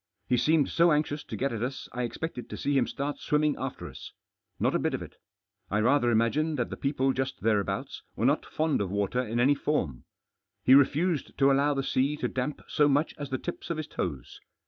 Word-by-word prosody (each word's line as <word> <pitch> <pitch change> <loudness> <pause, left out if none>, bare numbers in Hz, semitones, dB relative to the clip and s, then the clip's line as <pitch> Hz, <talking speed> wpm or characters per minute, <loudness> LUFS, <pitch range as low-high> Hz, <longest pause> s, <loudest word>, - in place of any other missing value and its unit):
He 125 - +3
seemed 145 +4 +3
so 170 0 +4
anxious 150 0 0
to - - -6
get 135 -1 -1
at 110 - -4
us 130 +2 -4
I 125 - -3
expected 125 +2 -4
to - - -6
see 145 0 0
him 130 -3 +3
start 145 +1 -4
swimming 150 0 +1
after 135 -1 -5
us. - - -10 0.5
Not - - +2
a - - +2
bit - - 0
of - - -5
it. - - -13 0.5
I 105 - 0
rather 120 +2 +3
imagine 120 +8 +2
that 125 -4 -2
the - - -3
people 135 -1 0
just 135 0 -3
thereabouts 105 +4 -1
were 115 - -1
not 145 +4 +3
fond 155 -6 0
of 100 - -2
water 100 +5 0
in 120 -1 -2
any 135 +4 +5
form. 140 - -2 0.6
He 130 - +6
refused 150 +4 +3
to 140 0 +5
allow 140 +2 +3
the 135 - -1
sea 140 +3 +1
to - - -1
damp 130 +3 -3
so 150 - +3
much 145 +3 +2
as 145 -2 -5
the 130 - -1
tips 175 - -6
of 170 - -2
his 155 - -3
toes. 70 - -5
135 Hz, 220 wpm, -28 LUFS, 120-150 Hz, 0.6 s, He